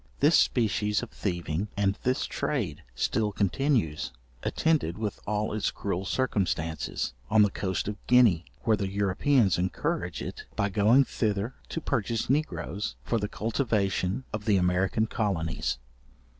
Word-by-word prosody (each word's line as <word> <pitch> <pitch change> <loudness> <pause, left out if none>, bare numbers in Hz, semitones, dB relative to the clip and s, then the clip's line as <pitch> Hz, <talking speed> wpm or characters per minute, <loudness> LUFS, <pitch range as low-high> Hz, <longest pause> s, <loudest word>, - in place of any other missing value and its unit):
This 150 +4 +5
species 105 -2 +2
of 120 - -7
thieving, 85 0 -2
and 100 -1 +2
this 125 +1 +1
trade, - - -2
still 105 - 0
continues, 100 - 0 0.3
attended 150 - +1
with 110 -2 -3
all 105 0 0
its 110 - 0
cruel 95 -1 -3
circumstances, 90 - -1 0.2
on 110 -1 +6
the 105 - +2
coast 95 -2 -2
of 105 0 -3
Guinea, 115 -9 +5 0.2
where 115 -2 +4
the 100 -2 -2
Europeans 100 - +2
encourage 95 - -2
it - - -7
by 100 - +1
going 110 +7 +5
thither 110 +1 -1 0.2
to - - -3
purchase 115 -2 -1
negroes 105 - -1
for 115 - 0
the 105 - -1
cultivation 105 - 0
of 105 0 -4
their 105 -4 +4
American 90 +4 +2
colonies. 95 - -1
105 Hz, 140 wpm, -28 LUFS, 95-115 Hz, 0.3 s, on